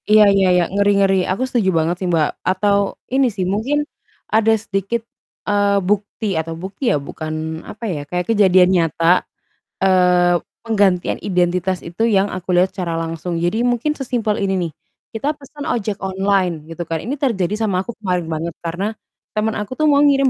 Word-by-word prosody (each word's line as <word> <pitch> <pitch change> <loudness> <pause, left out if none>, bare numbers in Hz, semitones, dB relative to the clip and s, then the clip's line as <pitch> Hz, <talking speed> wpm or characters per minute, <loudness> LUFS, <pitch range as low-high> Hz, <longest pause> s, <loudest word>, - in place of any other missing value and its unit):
Iya 215 0 +7
iya 195 -1 +3
iya. 180 - +4
Ngeri 200 0 +3
ngeri. 195 -1 +3 0.2
Aku 195 +7 -1
setuju 240 -7 +1
banget 165 +2 +1
sih, 185 - -1
Mbak. 160 -3 +2 0.2
Atau 200 +1 +1 0.2
ini 265 0 +4
sih, 185 -3 -1
mungkin 240 +11 0 0.5
ada 225 0 +4
sedikit, 205 +2 -2 0.4
eee, 205 -1 +2
bukti 205 0 -1
atau 165 +1 -4
bukti 195 +8 -3
ya, - - +3
bukan 155 +2 -6 0.4
apa 215 - -10
ya, 170 -9 -2
kayak 180 0 -1
kejadian 190 -4 +5
nyata, 165 0 +3 0.6
eee, 180 -2 +4 0.2
penggantian 200 -5 +2
identitas 180 0 0
itu 170 +6 -3
yang 200 -2 +3
aku 185 0 -7
lihat 180 +2 +3
secara 175 -3 -3
langsung. 165 +1 -4
Jadi 175 +7 0
mungkin 245 +5 +1
sesimpel 235 -5 -1
ini 195 -1 +1 0.2
nih, - - -16 0.4
kita 275 +7 -1
pesan 285 +1 -9
ojek 215 -6 -1
online 190 -4 0
gitu 165 +1 -4
kan, 165 -1 -1
ini 265 +5 -2
terjadi 210 -8 0
sama 195 -4 0
aku - - -4
kemarin 180 -4 -1
banget 160 +1 -3
karena 175 +4 -2 0.5
teman 215 +1 0
aku 210 +4 -5
tuh 310 - +3
mau 285 - +4
ngirim 275 -2 +4
195 Hz, 175 wpm, -19 LUFS, 175-220 Hz, 0.6 s, Iya